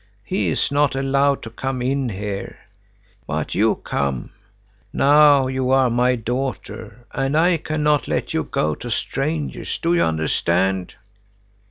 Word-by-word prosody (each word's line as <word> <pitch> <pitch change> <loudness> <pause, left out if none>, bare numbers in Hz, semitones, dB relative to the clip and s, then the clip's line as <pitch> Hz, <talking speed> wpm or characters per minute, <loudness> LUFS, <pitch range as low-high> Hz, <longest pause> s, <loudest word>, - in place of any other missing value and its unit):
He 190 - -1
is - - 0
not 145 -1 +2
allowed 135 +1 +1
to 115 - -8
come 130 +2 -3
in 130 +1 0
here. 100 -1 -5 0.7
But - - -3
you - - +3
come. 70 -3 -3 0.6
Now 145 -1 +5
you 130 0 -1
are 130 -2 +4
my 125 +2 +2
daughter, 120 -2 -5
and 135 +3 0
I 170 +1 +4
cannot 150 -2 0
let - - -2
you - - 0
go 75 0 -1
to 120 - -7
strangers, 145 +6 -2
do 170 +1 0
you 175 - +3
understand?" 90 +4 0
130 Hz, 140 wpm, -21 LUFS, 110-145 Hz, 0.7 s, Now